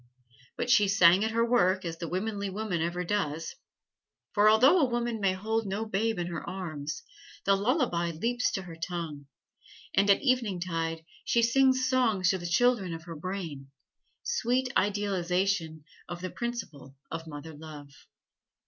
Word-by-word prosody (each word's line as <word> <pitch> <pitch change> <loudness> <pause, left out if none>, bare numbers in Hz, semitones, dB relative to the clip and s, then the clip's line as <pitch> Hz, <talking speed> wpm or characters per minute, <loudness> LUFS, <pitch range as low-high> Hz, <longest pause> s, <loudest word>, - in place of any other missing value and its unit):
But 245 - 0
she 210 -5 +5
sang 190 0 +6
at 220 - +1
her 230 +1 +1
work, 190 -6 +2
as 165 -1 -5
the 170 - -4
womanly 200 +2 -2
woman 195 -3 -2
ever 170 +2 -1
does. 165 -5 -2 0.8
For 210 +1 +5
although 260 +11 +6
a 275 -5 +3
woman 240 -1 -1
may 195 -1 +2
hold 220 +3 -2
no 200 +3 -2
babe 220 +1 0
in 175 - -1
her 170 -2 -5
arms, 155 -3 -5 0.4
the 195 - +5
lullaby 200 - +1
leaps 235 +10 -1
to 190 - -2
her 175 -3 -9
tongue, 160 -4 -5 0.7
and 200 +1 +3
at 200 - +4
eventide 175 - -1 0.2
she 235 - +2
sings 260 +2 +3
songs 225 -8 +2
to 190 - -2
the 175 - -5
children 195 -2 +2
of 165 - -9
her 165 -1 -8
brain 160 -5 -6 0.5
sweet 255 - 0
idealization 190 -4 0 0.3
of 175 0 -6
the 185 - -4
principle 195 - -6 0.2
of 165 0 -5
mother 155 +1 -8
love. 150 -2 -10
190 Hz, 155 wpm, -29 LUFS, 165-225 Hz, 0.8 s, sang